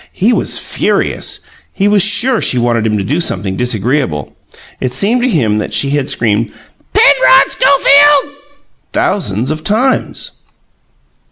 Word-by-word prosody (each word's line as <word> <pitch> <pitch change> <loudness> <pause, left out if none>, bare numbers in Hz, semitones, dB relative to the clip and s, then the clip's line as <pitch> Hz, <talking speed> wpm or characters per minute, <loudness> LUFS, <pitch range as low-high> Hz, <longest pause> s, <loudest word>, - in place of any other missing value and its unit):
He 225 +6 0
was - - 0
furious; - - -2 0.3
he 200 - -1
was 205 -1 +3
sure 215 +5 +2
she 125 - +2
wanted 120 -2 0
him 105 -1 -1
to 100 - -3
do 145 - -2
something 95 - -3
disagreeable. 120 - -2 0.4
It 130 -1 -3
seemed 225 - +1
to 255 - 0
him 115 - 0
that - - -4
she 140 - +1
had 145 -2 -2
screamed 110 0 -1 0.4
"Penrod - - +4
Schofield!" 285 - +3 0.6
thousands 120 - -2
of 155 0 -5
times. 245 +7 -2
150 Hz, 140 wpm, -12 LUFS, -, 0.6 s, Penrod